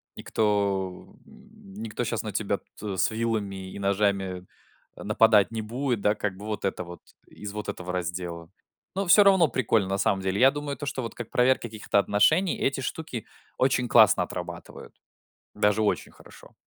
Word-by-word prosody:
Никто, 100 -3 -1 0.2
м, 95 - -17
никто 110 +3 -4
щас 115 -1 -2
на 105 - -4
тебя 100 -1 -1 0.2
тут, 105 -1 -4
э, - - -5
с - - +2
вилами 100 -4 -3
и - - -7
ножами 100 -2 0 0.5
нападать 110 -2 +3
не 110 -1 -3
будет. 120 +1 -2
Да, 105 +1 +2
как 100 -2 -3
бы, 105 - -9
вот 110 -1 -4
это 95 -2 -2
вот. 85 0 -11 0.3
Из 105 -1 -8
вот 105 -1 -6
этого 90 0 -5
раздела. 85 -2 -4 0.5
Но 195 0 -1
все 205 +4 +8
равно 190 -6 +5
прикольно 110 -6 +1
на 95 - 0
самом 100 -1 +1
деле. 95 +1 -1
Я 135 +2 +7
думаю, 145 -2 -5
то, 145 - -6
что 135 -2 -3
вот 115 -2 -5
как 120 -2 -7
проверка 130 +1 +2
каких-то 110 -3 0
отношений- 155 - +3
эти 135 0 0
штуки 130 -4 -5 0.3
очень 125 -2 +1
классно 110 -4 +6
отрабатывают! - - -8 0.6
Даже 105 +1 +2
очень 105 - -1
хорошо! - - -17
105 Hz, 175 wpm, -26 LUFS, 95-120 Hz, 0.6 s, все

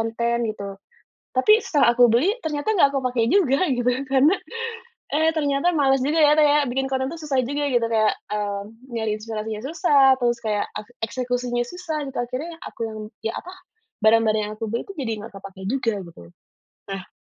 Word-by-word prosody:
konten 235 +1 0
gitu, 200 -2 -6 0.6
tapi 425 - +5
setelah 280 -5 +3
aku 245 -1 +6
beli 300 - +3
ternyata 310 +7 -1
nggak 285 -8 +5
aku 275 - -1
pakai 235 -2 +1
juga 330 -5 +3
gitu 245 -1 0 0.2
karena, 275 +7 +5 0.8
eh, 315 +1 +3
ternyata 290 +1 +1
malas 270 -5 +2
juga 295 +5 +1
ya 300 0 +6
kayak 295 -1 +4
bikin 270 +1 -1
konten 260 0 0
itu 330 +2 -7
susah 280 -3 0
juga 285 +2 -2
gitu 240 -2 +2
kayak, 220 -2 +3 0.2
eee, 205 -1 -2 0.3
nyari 225 -2 -2
inspirasinya 215 0 -5
susah 295 -1 +3 0.2
terus 240 -1 +1
kayak 210 -2 0
ak 210 - -5 0.2
eksekusinya 245 0 -1
susah 325 +3 -5
gitu 270 -1 -6
akhirnya 255 +8 -4 0.2
aku - - -19 0.4
yang 225 +1 -2
apa 365 - -9 0.5
barang-barang 220 0 +4
yang - - -5
aku 225 - -3
beli 235 - -1
itu 395 - -8
jadi 240 -5 -2
nggak - - -10
terpakai 195 -1 -10
juga 255 -4 0
gitu, 170 - -13 0.7
nah. 195 -1 -6
250 Hz, 175 wpm, -23 LUFS, 225-295 Hz, 0.8 s, aku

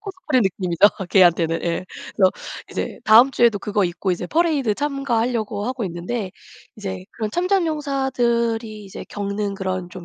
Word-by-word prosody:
코스프레 370 - -1
느낌이죠 185 -1 +3 0.2
걔한테는. 170 -3 +4
예. 170 +1 -2 0.3
그래서 185 -2 +5 0.4
이제 - - -4
다음 235 +5 +7
주에도 235 -4 +3
그거 205 0 0
입고 175 +2 -2
이제 175 0 -2
퍼레이드 295 - +1
참가하려고 240 -7 -1
하고 255 -3 -3
있는데 185 +4 -4 0.5
이제 190 -3 -6
그런 215 -2 -4
참전용사들이 265 - 0
이제 195 - -9
겪는 200 0 -3
그런 185 -2 -3
좀 185 -2 -9
215 Hz, 360 characters per minute, -21 LUFS, 190-260 Hz, 0.5 s, 다음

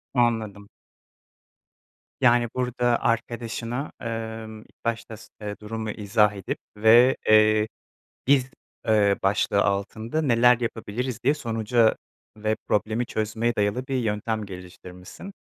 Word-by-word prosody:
Anladım. 110 -4 0 1.5
Yani, 120 -1 +4
burada 125 -1 +1
arkadaşına, 115 +3 -2
ımm, 110 -1 -5
ilk - - -25
başta 115 -1 -3
s - - -14
eee, 105 -1 -4
durumu 110 +1 -5
izah 105 0 +2
edip 100 -2 -4 0.2
ve, 120 +5 +6
eee, 110 0 +5 0.6
“Biz,” 135 -2 +3 0.4
ııı, 100 -2 +3
başlığı 100 0 +2
altında 110 +8 -1
neler 125 -3 +4
yapabiliriz 120 +1 -3
diye 140 +4 +4
sonuca 115 -3 +1 0.4
ve 110 +1 0
problemi 110 +3 0
çözmeye 110 +2 -1
dayalı 105 +5 -1
bir 135 - -2
yöntem 110 -2 -1
geliştirmişsin. 90 - -11
110 Hz, 110 wpm, -25 LUFS, 105-120 Hz, 1.5 s, ve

